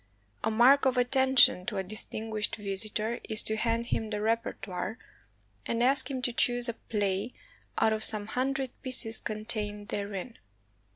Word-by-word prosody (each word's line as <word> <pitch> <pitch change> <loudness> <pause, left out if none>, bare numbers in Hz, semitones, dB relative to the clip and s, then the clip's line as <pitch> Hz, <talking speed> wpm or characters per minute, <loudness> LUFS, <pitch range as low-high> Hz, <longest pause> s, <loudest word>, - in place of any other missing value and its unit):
A 220 - 0
mark 250 +6 +3
of 255 -1 -1
attention 260 -5 +4
to - - -4
a 190 - -2
distinguished 215 +2 -4
visitor 215 +2 -3
is 215 - 0
to 220 - -2
hand 230 +1 -2
him 225 -2 -4
the 210 -1 -4
repertoire, 215 -2 -4 0.7
and 230 +1 -2
ask 265 0 +5
him 260 -2 -6
to 245 - -1
choose 245 +1 +8
a 235 - -2
play 205 0 -4 0.4
out 220 - +1
of 215 0 -4
some 215 -2 +2
hundred 265 +3 -3
pieces 250 -4 0
contained 210 -1 -5
therein. 205 +3 -6
225 Hz, 155 wpm, -27 LUFS, 210-245 Hz, 0.7 s, choose